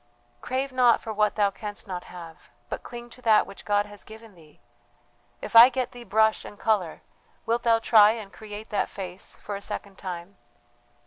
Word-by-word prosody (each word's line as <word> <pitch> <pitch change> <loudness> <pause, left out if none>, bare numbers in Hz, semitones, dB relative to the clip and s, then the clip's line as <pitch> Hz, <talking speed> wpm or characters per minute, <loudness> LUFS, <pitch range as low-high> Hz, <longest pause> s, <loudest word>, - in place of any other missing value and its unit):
"Crave 260 +2 -2
not 250 -2 +4
for 220 - -6
what 210 0 +1
thou 205 -2 +2
canst 205 +2 -7
not 180 -2 -6
have, 170 -2 -12 0.2
but - - -4
cling 240 0 -10
to 250 - -15
that 220 -3 +4
which - - -12
God 205 0 +2
has 205 -1 -12
given 220 0 -13
thee. 160 -4 -20 0.8
If - - -6
I 235 +2 +11
get 260 -2 -3
thee 245 -1 -10
brush 220 +1 +2
and 205 - -11
colour 200 -7 -1 0.4
wilt 235 +1 0
thou 230 -1 +4
try 220 -2 +6
and 215 -4 -9
create 215 0 -9
that 205 - -1
face 185 -1 -8
for 205 - -6
a 200 - -6
second 200 -1 -7
time? 185 0 -7
210 Hz, 190 wpm, -26 LUFS, 195-230 Hz, 0.8 s, I